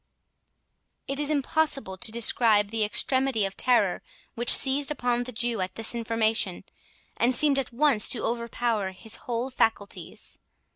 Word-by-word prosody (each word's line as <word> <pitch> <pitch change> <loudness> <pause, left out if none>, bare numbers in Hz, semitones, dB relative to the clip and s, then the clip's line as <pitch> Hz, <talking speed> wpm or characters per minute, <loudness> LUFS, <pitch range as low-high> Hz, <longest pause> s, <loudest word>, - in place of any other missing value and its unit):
It 275 0 -4
is 295 0 -1
impossible 285 -7 0
to 190 - -2
describe 220 -2 +2
the 225 -1 0
extremity 235 +1 +1
of 195 - -6
terror 225 -7 +1 0.3
which 240 +1 -1
seized 275 +2 +1
upon 245 -4 -1
the 250 - -7
Jew 235 -2 -2
at 185 - -4
this 225 +1 -2
information, 225 -4 0 0.5
and 245 +2 +4
seemed 285 0 +4
at 260 - -4
once 245 -4 +2
to 235 - -1
overpower 235 -4 -2
his 220 +4 -6
whole 240 +2 -2
faculties. 225 -5 -3
235 Hz, 145 wpm, -26 LUFS, 215-260 Hz, 0.5 s, and